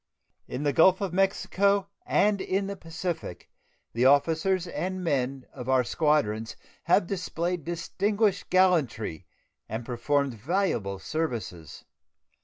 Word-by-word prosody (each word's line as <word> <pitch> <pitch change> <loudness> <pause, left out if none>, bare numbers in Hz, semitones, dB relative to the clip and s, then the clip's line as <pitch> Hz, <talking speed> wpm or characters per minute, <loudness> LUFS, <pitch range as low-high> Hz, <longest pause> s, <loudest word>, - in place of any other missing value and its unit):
In 140 - -4
the 145 -1 +1
Gulf 185 +5 +5
of 195 -4 -3
Mexico 195 +1 +2 0.2
and 205 -1 +2
in 195 +1 -1
the 200 0 -4
Pacific 165 - -5 0.4
the 120 - 0
officers 165 +6 +3
and 185 +1 -4
men 135 -4 -1
of 125 -1 -7
our 130 -1 +4
squadrons 120 -7 0 0.3
have - - +4
displayed 175 -2 -3
distinguished 200 +5 -1
gallantry 160 - +1 0.4
and 110 +2 -4
performed 135 +3 0
valuable 115 - -1
services. 115 - -4
165 Hz, 115 wpm, -27 LUFS, 125-185 Hz, 0.4 s, Gulf